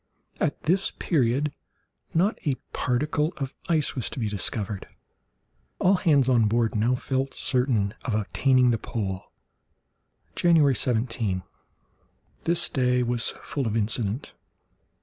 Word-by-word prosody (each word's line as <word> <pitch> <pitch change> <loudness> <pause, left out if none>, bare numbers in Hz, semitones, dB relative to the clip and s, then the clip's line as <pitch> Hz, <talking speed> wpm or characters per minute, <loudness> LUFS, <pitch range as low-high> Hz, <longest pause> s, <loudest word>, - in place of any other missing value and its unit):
At 150 - -1
this 185 +5 +2
period 140 -1 0 0.6
not 190 +7 +1
a 140 -3 +1 0.2
particle 150 +6 0
of 135 -2 -4 0.2
ice 155 -4 +2
was 125 - -2
to - - -9
be 115 -4 -1
discovered. 105 -1 -2 0.9
All 185 - +4
hands 150 -8 +3
on 120 -4 +4
board 115 +1 +1
now 115 +4 +2
felt 135 +1 -2
certain 125 -7 +1
of 115 - -1
attaining 125 +4 +3
the 115 - 0
pole. 95 -4 -4 1.1
January 160 -5 +4
17.—This 115 - -3
day 125 -1 +2
was 120 -1 0
full 140 -5 -2
of 110 +1 0
incident. 110 +3 -1
125 Hz, 120 wpm, -26 LUFS, 110-145 Hz, 1.1 s, All